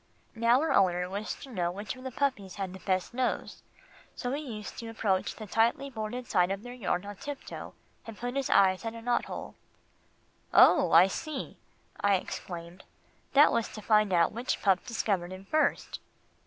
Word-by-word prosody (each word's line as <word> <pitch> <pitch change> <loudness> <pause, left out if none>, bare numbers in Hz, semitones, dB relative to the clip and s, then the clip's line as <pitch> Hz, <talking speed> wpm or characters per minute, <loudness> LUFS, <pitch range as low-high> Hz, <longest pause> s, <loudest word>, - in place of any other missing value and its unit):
Now 230 +2 +3
her 320 - +1
owner 180 -2 +3
wished 200 +3 -5
to 270 - -10
know 175 -6 -1
which 200 +5 -5
of 255 - -12
the 260 - -4
puppies 255 -8 -2
had 195 -2 -4
the 190 - -9
best 185 +2 -1
nose, 255 +1 -2 0.5
so 245 - -3
he 285 +3 -2
used 220 -8 -7
to 230 - -6
approach 205 -4 0
the 215 - -8
tightly 230 +7 +1
boarded 235 +2 -4
side 180 0 +3
of 195 +2 -3
their 245 0 -8
yard 200 -5 -2
on 205 0 -7
tiptoe, 285 +4 -7 0.3
and 225 -2 -8
put 245 +1 -4
his 275 -1 -1
eye 190 -1 +6
at 225 +5 -6
a 230 - -8
knot 240 0 +1
hole. - - -7 1.0
"Oh! - - +7
I 170 +3 +8
see," 280 +8 -5 0.4
I 200 -1 +3
exclaimed, 175 -1 -6 0.5
"that 285 +2 +7
was 230 -1 +1
to 215 - -7
find 215 -2 +3
out 170 -2 +3
which 235 +4 -3
pup 195 -3 +3
discovered 195 -6 -1
him 185 +1 -9
first." 310 +7 0
215 Hz, 185 wpm, -29 LUFS, 190-245 Hz, 1.0 s, I